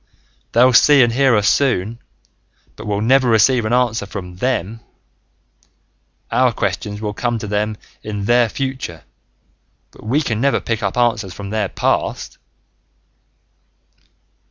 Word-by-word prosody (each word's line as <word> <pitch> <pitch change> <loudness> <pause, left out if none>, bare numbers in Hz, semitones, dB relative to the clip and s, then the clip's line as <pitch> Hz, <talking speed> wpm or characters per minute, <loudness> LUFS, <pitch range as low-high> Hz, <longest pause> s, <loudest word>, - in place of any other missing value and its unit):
They'll 125 +2 +5
see 140 +2 +6
and 120 -1 +1
hear 135 -1 +3
us 105 0 +1
soon, 115 -5 +1 0.8
but 105 - -9
we'll 100 0 -1
never 130 +2 +3
receive 115 +2 +3
an 110 - -2
answer 120 -4 +1
from 90 -3 -8
them! 115 -2 -2 1.5
Our - - +3
questions 105 0 -3
will 105 -1 -4
come 120 +2 -2
to 110 - -6
them 105 +1 -2 0.2
in 105 -2 -5
their 120 +1 +3
future 130 - -5 0.9
but - - -17
we 135 +8 0
can 115 -4 -2
never 140 +1 +2
pick 115 -1 -3
answers 110 -2 -1
from 100 0 -7
their 105 -3 -1
past!" - - -2
110 Hz, 130 wpm, -18 LUFS, 105-125 Hz, 1.5 s, see